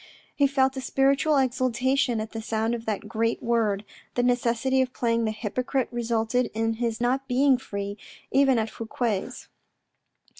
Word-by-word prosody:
He 285 - +4
felt 265 -1 +2
a 265 - -4
spiritual 275 +3 +2
exultation 255 -1 +1
at 215 0 -5
the 225 - -5
sound 225 +1 -1
of 230 -1 -5
that 210 -3 -2
great 230 +1 -1
word. 220 -4 +1 0.3
The 245 - +1
necessity 245 +1 +2
of 255 -1 -2
playing 230 -1 +1
the 215 - 0
hypocrite 250 +4 -2
resulted 235 +1 0
in 225 0 +1
his 230 0 -2
not 260 +3 0
being 265 0 +3
free, 200 -3 -5 0.3
even 270 -1 +4
at 220 -1 -1
Fouque's. 225 -3 -3
240 Hz, 155 wpm, -26 LUFS, 225-265 Hz, 0.3 s, He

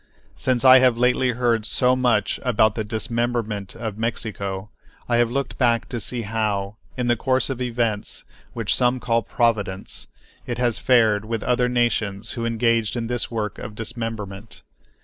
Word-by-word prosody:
Since 130 0 0
I 130 0 +10
have 125 -2 +4
lately 125 +1 +2
heard 120 -2 +1
so 125 +3 +2
much 120 -5 +1
about 110 -4 +3
the 110 - -2
dismemberment 115 -2 -2
of 110 -2 -5
Mexico 105 -3 -3 0.4
I 120 - +2
have 120 -1 +3
looked 135 +1 -3
back 120 -3 +2
to 120 - -3
see 120 +1 -1
how, 105 -1 -2 0.2
in 125 - -1
the 120 0 +3
course 130 +3 +1
of 130 -1 -5
events, 115 -4 -1 0.3
which 115 -3 0
some 125 0 +2
call 115 -1 +1
"providence," 110 -6 -1 0.4
it 120 -1 -3
has 120 -2 +1
fared 110 -5 +3
with 115 0 -3
other 125 0 +2
nations 110 -4 0
who 115 -1 -2
engaged 115 -1 +1
in 120 -1 -2
this 120 +1 -2
work 110 -3 -3
of 105 - -7
dismemberment. 110 -2 -6
115 Hz, 165 wpm, -23 LUFS, 110-125 Hz, 0.4 s, I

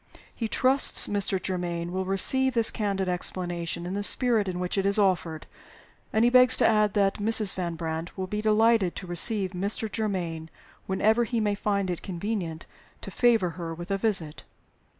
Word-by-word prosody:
He 230 - -4
trusts 260 +5 +5
Mr. 200 -2 -1
Germaine 175 -2 -4
will 190 +1 -3
receive 260 +7 +1
this 230 -1 +3
candid 195 -3 -3
explanation 175 -1 -3
in 180 - -5
the 200 - -3
spirit 225 -1 +4
in 180 -1 -4
which 180 -1 -3
it 195 - -1
is 200 +1 +2
offered; 180 -6 -1 0.7
and 220 +2 +1
he 240 - +2
begs 250 -1 +6
to - - +3
add 215 -2 +1
that 200 -1 0
Mrs. 215 -1 +1
Van 175 -2 -5
Brandt 160 +2 -6
will 190 - -3
be 210 +3 -5
delighted 215 -3 +1
to 195 - -8
receive 190 +2 +2
Mr. 200 +3 -3
Germaine 175 -7 -4 0.4
whenever 220 +5 +1
he 235 0 -3
may 210 -1 -1
find 200 -2 -2
it 175 - -6
convenient 175 -3 -5 0.4
to - - -9
favor 225 -8 +1
her 165 -1 -6
with 175 +3 -9
a 195 - 0
visit." 190 -8 -3
195 Hz, 180 wpm, -25 LUFS, 175-220 Hz, 0.7 s, begs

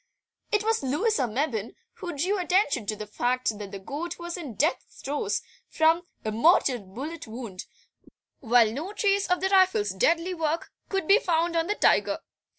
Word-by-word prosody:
It 425 -1 +2
was 445 +1 +1
Louisa 295 - +1
Mebbin 230 -2 -2 0.2
who 350 -6 -6
drew 375 +7 0
attention 355 - +1
to 215 - -1
the 215 0 -6
fact 245 +2 -1
that 200 -2 -7
the 200 - -5
goat 300 - -5
was 345 0 -5
in 295 - -7
death 305 - +1 0.2
throes 295 +10 -1 0.3
from 325 +2 +2 0.2
a 215 - 0
mortal 250 +1 +4
bullet 260 - -7
wound, 220 -5 -7 0.7
while 235 -2 +4
no 315 - -5
trace 400 -1 +1
of 360 0 +2
the 385 - +1
rifle's 375 - +4
deadly 335 - +1
work 325 -1 -2 0.2
could 385 -5 -1
be 405 +3 +6
found 340 -4 0
on 330 0 +1
the 415 - 0
tiger. - - +3
315 Hz, 170 wpm, -27 LUFS, 235-360 Hz, 0.7 s, be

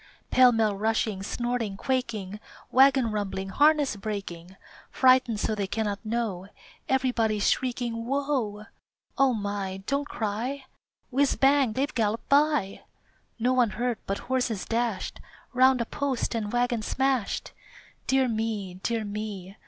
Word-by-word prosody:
Pell 255 -1 +7
mell 220 -3 +1
rushing, 215 -1 0
snorting, 235 -1 -2
quaking, 220 -6 -2 0.3
Wagon 265 -3 +5
rumbling, 195 -2 -3
harness 290 +1 +3
breaking, 195 -4 -6 0.3
Frightened 255 -4 +4
so 220 - 0
they 205 -2 -2
cannot 210 0 -2
know 215 -5 -2 0.4
Everybody's 235 -6 +1
shrieking 240 -2 -2
"Whoa!" 260 -7 -1 0.5
O 270 -2 +5
my, 200 -2 -4
don't 280 +3 -1
cry! 240 +6 -3 0.5
Whiz, 275 +2 +2
bang, 270 -4 +3
they've 280 +5 -1
galloped 220 -1 -1
by! 285 -8 +2 0.6
No 245 +2 +1
one 250 -3 +3
hurt, 240 -1 -1
but 195 - -1
horses 245 -5 -1
dashed 230 -3 -2 0.3
Round 260 0 +5
a - - -1
post 270 -1 -2
and 215 -3 -2
wagon 245 -1 +1
smashed! 265 0 -1 0.6
Dear 265 -1 +3
me! 215 -5 -3
Dear 230 0 -1
me! 205 -2 -6
230 Hz, 130 wpm, -27 LUFS, 205-260 Hz, 0.6 s, Pell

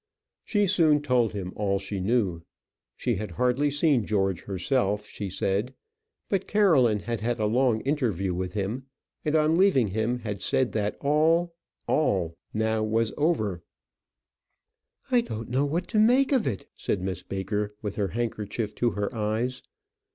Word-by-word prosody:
She 205 -2 +1
soon 160 -6 +3
told 125 -6 +2
him 95 -3 -5
all 100 -2 0
she 100 0 -4
knew. 95 -5 +1 0.6
She 120 -5 0
had 105 +2 -4
hardly 125 +4 +2
seen 145 -4 +2
George 95 -4 0
herself, 105 +1 0
she 100 -1 -6
said. 100 +6 -1 0.5
But 195 -2 -1
Caroline 140 - +4
had 115 -2 -3
had 120 +2 -1
a 110 - 0
long 115 +1 +2
interview 115 - 0
with 90 0 -3
him, 110 +6 -3 0.4
and 155 0 0
on 155 +1 +3
leaving 160 - +4
him 110 +5 0
had 105 -3 -4
said 130 -2 +1
that 105 -1 -1
all 165 +4 +2 0.3
all 95 - +1 0.2
now 110 0 0
was 110 +1 0
over. 110 - 0 1.5
"I 245 -1 +5
don't 115 - -6
know 130 +4 +1
what 165 +5 -2
to 215 - +2
make 250 +6 +4
of 260 -6 +2
it," 100 -7 -3
said 95 - -2
Miss 95 -1 -3
Baker, 100 +2 -3
with 105 -2 -3
her 100 -2 +1
handkerchief 110 0 -3
to 120 - +1
her 105 +4 -2
eyes. 115 +3 -1
115 Hz, 160 wpm, -27 LUFS, 100-145 Hz, 1.5 s, I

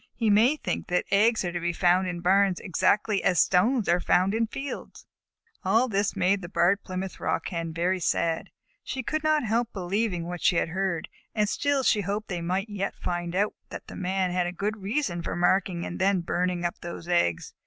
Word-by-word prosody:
He 225 -3 +1
may 230 +8 +5
think - - -4
that 180 0 0
eggs 220 +1 +3
are 175 - -1
to 175 - -3
be 175 0 -1
found 180 +2 +3
in 175 -1 -4
barns 190 +1 +3
exactly 200 +3 +1
as 180 - +3
stones 215 +5 +3
are 175 +1 +3
found 185 +2 +2
in 225 0 +1
fields." 270 +5 -7 0.6
All 235 +3 +3
this 200 -3 0
made 195 +2 +2
the 175 - -7
Barred 195 +1 +2
Plymouth 185 0 -5
Rock - - -1
Hen 165 -2 -3
very 175 +3 0
sad. 165 -1 0 0.3
She 260 - -4
could 310 +5 -2
not 310 -1 +2
help 230 +1 0
believing 185 -1 -1
what 175 0 -5
she - - +3
had 165 - +1
heard, 190 -1 -2 0.3
and 210 -1 +2
still 285 +4 0
she 215 -4 +3
hoped 205 +3 -3
they 180 -2 -3
might 185 +4 -1
yet 200 -2 -3
find 175 0 -3
out 205 +2 +1 0.2
that - - -8
the - - -10
Man 185 0 -1
had 180 0 0
a - - -3
good 205 +4 -3
reason 195 -4 -1
for - - -4
marking 175 0 +1
and 175 - -6
then 190 -1 +2
burning 175 +1 -1
up 175 +3 -3
those 170 0 -8
eggs. 170 - +1
190 Hz, 205 wpm, -27 LUFS, 175-210 Hz, 0.6 s, may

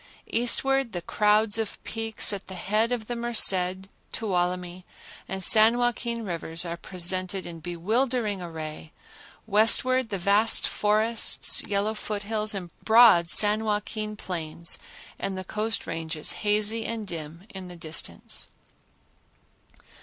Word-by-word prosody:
Eastward 265 +2 +2
the 175 - -4
crowds 210 +1 +2
of 220 -2 -3
peaks 225 -1 -1
at 195 -1 -6
the 190 - -8
head 215 +6 0
of 235 -3 -2
the 240 - -4
Merced, 190 -6 +2 0.2
Tuolumne 180 -3 -2 0.4
and 190 0 -5
San 220 +5 +6
Joaquin 235 -1 -2
Rivers 170 -1 -2
are 170 0 -4
presented 185 +2 -1
in 170 -1 -8
bewildering 210 - -1
array; 160 -2 -7 0.5
westward, 225 +4 +2
the 200 - -2
vast 200 +5 +3
forests, 215 +2 +2
yellow 205 +2 0
foothills 215 0 -2
and 180 -3 -5
the - - -32
broad 220 -7 +6
San 210 +3 +5
Joaquin 215 0 -3
plains 170 -3 -3 0.4
and 195 -1 -4
the 185 - -5
Coast 215 +3 -2
Ranges, 160 -2 -3
hazy 215 +2 0
and 225 -1 -4
dim 165 0 -7
in 190 -1 -8
the 180 - -10
distance. 160 -2 -5
205 Hz, 130 wpm, -26 LUFS, 180-220 Hz, 0.5 s, San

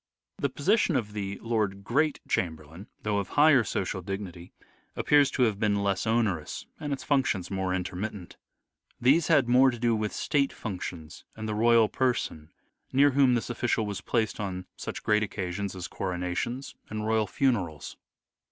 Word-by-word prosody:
The 140 - 0
position 180 - +2
of 110 -5 -1
the 100 -1 -4
Lord 105 -4 -1
Great 145 +7 +1
Chamberlain, 80 +2 -3 0.2
though 105 -1 0
of 100 - -3
higher 145 -4 +5
social 95 -2 -2
dignity, 90 -2 -6 0.4
appears 145 -2 +4
to 130 - +1
have 110 -4 +1
been 100 -2 +1
less 100 -1 0
onerous 110 -9 0
and 145 - -4
its 135 -2 -3
functions 130 -11 0
more 95 -1 -1
intermittent. 95 +1 -4 0.6
These 140 +7 +4
had 145 -7 +4
more 130 +2 +6
to 120 - -4
do 115 0 +2
with 105 -1 -1
state 140 -2 0
functions 90 -5 -7
and 110 0 -5
the 110 - -2
royal 115 +1 +5
person, 120 - -1 0.4
near 140 +2 +5
whom 135 -2 +4
this 120 +1 -2
official 120 -2 0
was 100 -1 -4
placed 110 +1 -1
on 95 -3 -4
such - - -6
great 105 0 +3
occasions 100 -1 -3
as 90 -1 -5
coronations 90 +8 -3 0.2
and 105 0 -4
royal 110 -1 +1
funerals. 95 - -1
105 Hz, 160 wpm, -28 LUFS, 95-125 Hz, 0.6 s, more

